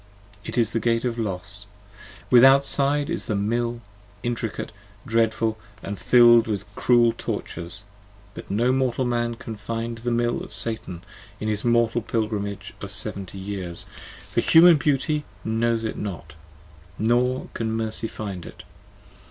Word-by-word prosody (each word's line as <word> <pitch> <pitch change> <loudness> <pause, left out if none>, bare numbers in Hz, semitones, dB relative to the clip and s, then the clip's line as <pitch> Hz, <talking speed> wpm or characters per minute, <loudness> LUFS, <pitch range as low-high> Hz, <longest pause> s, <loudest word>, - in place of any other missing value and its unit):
It - - -6
is 115 -2 +2
the 115 - 0
Gate 115 +2 +1
of 120 -1 -2
Los. 100 0 -5 0.6
Withoutside 140 +3 +5
is - - -3
the 110 - 0
Mill, 120 +3 -1 0.4
intricate, 120 -3 -3 0.3
dreadful 115 -1 +1 0.2
And 100 0 -5
fill'd 120 -2 +6
with 105 -2 -2
cruel 120 -2 +4
tortures: 85 +5 -5 0.5
but - - -10
no 115 +5 +2
mortal 130 -1 +1
man 120 -1 0
can 115 -1 -7
find 115 +2 -4
the 120 +2 -2
Mill 120 0 +1
5 - - -6
Of - - -13
Satan 95 -6 -4 0.4
in 110 - -3
his 105 -1 -2
mortal 120 0 +2
pilgrimage 100 -3 -3
of 100 - -6
seventy 100 -1 -5
years, 95 -3 -5 0.5
For - - +2
Human 165 0 +7
beauty 150 +1 0 0.2
knows 115 +1 +1
it 110 - -3
not: 85 -6 -6 0.6
nor 125 +3 +1
can 110 -1 -2
Mercy 110 0 -2
find 100 -6 -6
it! - - -11
115 Hz, 145 wpm, -24 LUFS, 105-120 Hz, 0.6 s, Human